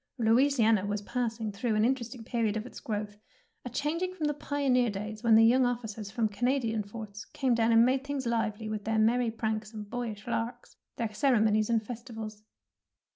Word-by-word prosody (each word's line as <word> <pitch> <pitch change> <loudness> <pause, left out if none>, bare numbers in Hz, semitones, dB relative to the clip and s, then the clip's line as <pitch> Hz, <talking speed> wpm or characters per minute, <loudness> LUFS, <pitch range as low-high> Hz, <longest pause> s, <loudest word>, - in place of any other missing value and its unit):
Louisiana 225 -3 +4
was 205 0 -2
passing 225 -2 -2
through 215 +2 -1
an 215 +1 +3
interesting 245 -1 -2
period 225 -2 0
of 215 - -4
its 255 - -9
growth, 210 -1 -4 0.5
a 250 - -5
changing 330 +8 -2
from 320 -4 -2
the 295 - +1
pioneer 275 -4 +1
days 210 +1 -5
when 230 -2 +5
the 225 +1 +7
young 255 +3 +5
officers 225 -4 -2
from 225 +1 0
Canadian 230 +1 0
forts 210 0 -8
came 260 -3 0
down 230 0 +3
and 230 0 +6
made 260 +2 +1
things 280 -2 -3
lively 225 -2 -1
with 215 -1 -4
their 225 0 0
merry 230 +2 +3
pranks 220 -1 -3
and 210 -1 -6
boyish 235 -3 -4
larks, 240 0 -4 0.2
their 225 -2 -3
ceremonies 215 -3 +3
and 225 -2 +1
festivals. 225 -3 -7
225 Hz, 180 wpm, -29 LUFS, 215-245 Hz, 0.5 s, the